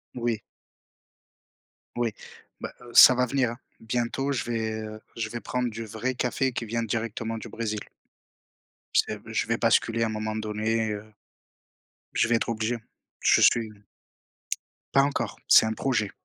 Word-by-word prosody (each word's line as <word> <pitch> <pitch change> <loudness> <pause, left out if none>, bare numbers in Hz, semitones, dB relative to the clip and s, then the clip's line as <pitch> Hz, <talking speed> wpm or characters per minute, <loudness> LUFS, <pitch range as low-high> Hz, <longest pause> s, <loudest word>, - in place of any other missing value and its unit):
Oui. 120 -3 -1 1.6
Oui, 115 -3 0 0.5
bah, - - -6
heu, 120 -1 -12
ça 130 - +10
va 125 - +3
venir, 125 -2 +1
hein. 120 - -8 0.2
Bientôt 120 +4 -1
je 130 -5 -1
vais, 115 -2 -1
heu, 110 0 -8 0.2
je 110 -1 -2
vais 120 - -5
prendre 125 -1 -1
du 115 +1 -6
vrai 110 +5 -2
café 130 +2 0
qui 115 - -3
vient 115 +1 -1
directement 115 0 -3
du 115 - -7
Brésil. 110 -1 -3 1.2
C'est - - +2
b - - -11
je - - +1
vais - - +1
basculer 115 0 +2
à - - +3
un - - -1
moment 110 0 -3
donné, 110 +1 -1
heu 105 +1 -6 1.1
je - - +2
vais 120 - +3
être 115 - 0
obligé. 115 +1 -1 0.4
Je - - +5
suis 115 -2 +4 1.2
pas 135 - +6
encore, 140 0 -1
c'est - - +8
un 110 - 0
projet. 110 -3 0
115 Hz, 165 wpm, -27 LUFS, 110-120 Hz, 1.6 s, ça